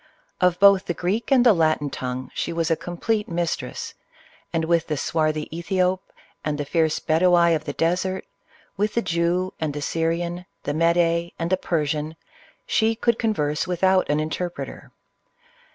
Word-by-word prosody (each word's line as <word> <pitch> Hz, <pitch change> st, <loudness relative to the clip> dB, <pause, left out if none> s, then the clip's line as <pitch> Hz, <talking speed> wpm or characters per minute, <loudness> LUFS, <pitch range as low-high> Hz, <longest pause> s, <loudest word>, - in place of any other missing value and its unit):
Of 180 Hz, -1 st, +3 dB
both 200 Hz, -1 st, +6 dB
the 175 Hz, -, -2 dB
Greek 205 Hz, +9 st, -2 dB
and 255 Hz, -2 st, +5 dB
the 235 Hz, -, +8 dB
Latin 155 Hz, -4 st, +1 dB
tongue 125 Hz, 0 st, -5 dB
she -, -, -2 dB
was 165 Hz, 0 st, -1 dB
a -, -, +4 dB
complete 210 Hz, +6 st, -2 dB
mistress, 170 Hz, -1 st, -3 dB, 0.6 s
and 165 Hz, -1 st, 0 dB
with 170 Hz, 0 st, +1 dB
the 150 Hz, -, -1 dB
swarthy 155 Hz, 0 st, 0 dB
Ethiop 185 Hz, +2 st, 0 dB, 0.4 s
and 150 Hz, -1 st, -1 dB
the 145 Hz, -, -3 dB
fierce 160 Hz, +1 st, +1 dB
Bedawi 170 Hz, +1 st, +4 dB
of 155 Hz, 0 st, -4 dB
the 145 Hz, -, -3 dB
des 165 Hz, +4 st, +1 dB
ert, 190 Hz, 0 st, -3 dB, 0.5 s
with 210 Hz, +2 st, 0 dB
the 235 Hz, -, +1 dB
Jew, 175 Hz, +2 st, 0 dB
the 150 Hz, -2 st, -2 dB
Syrian, 170 Hz, +4 st, -2 dB, 0.2 s
the 145 Hz, -, -2 dB
Mede, 170 Hz, +1 st, +2 dB
and 165 Hz, +1 st, -3 dB
the -, -, +5 dB
Per 165 Hz, -4 st, -1 dB
sian, 150 Hz, +2 st, -3 dB, 0.5 s
she 225 Hz, 0 st, +2 dB
could 235 Hz, 0 st, +1 dB
converse 150 Hz, -8 st, 0 dB
without 185 Hz, +1 st, +2 dB
an 150 Hz, +1 st, +2 dB
interpreter. 170 Hz, +3 st, -5 dB
170 Hz, 165 wpm, -23 LUFS, 155-185 Hz, 0.6 s, the